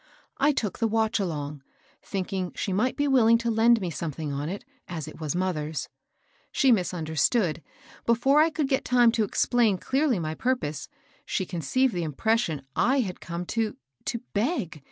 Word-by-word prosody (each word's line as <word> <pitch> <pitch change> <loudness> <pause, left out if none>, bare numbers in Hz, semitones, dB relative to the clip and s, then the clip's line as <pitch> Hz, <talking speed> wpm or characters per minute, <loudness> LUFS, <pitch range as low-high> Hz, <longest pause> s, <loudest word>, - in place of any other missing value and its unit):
I 285 +2 +5
took 220 -8 -2
the 230 - +2
watch 220 0 +1
along, 150 -6 -3 0.4
thinking 190 -2 -3
she 195 - -2
might 235 +7 +1
be 290 0 +1
willing 230 -4 +5
to 230 0 -1
lend 230 +1 +5
me 180 -4 -3
some 165 0 -3
thing 150 0 -5
on 145 +3 -3
it, 195 +3 -6 0.2
as 160 -4 -5
it 155 - -10
was 155 +1 -2
mother's. 160 -5 -2 0.6
She 270 -2 +4
misunder, 175 -6 0
stood; 170 - +2 0.5
before 255 +5 +4
I 320 - +4
could 305 -3 -1
get 270 -1 +1
time 245 -2 +4
to 225 -1 +1
explain 220 0 +2
clearly 270 +2 +1
my 155 -2 -2
purpose, 200 - -2 0.3
she 190 - -2
conceived 190 - 0
the 175 - -1
impression 165 - 0
I 260 +4 +3
had 185 -6 -5
come 170 +1 -5
to 225 -2 -1
— 130 - -43
to 235 -1 -2
beg. 210 - -1
205 Hz, 180 wpm, -26 LUFS, 165-240 Hz, 0.6 s, I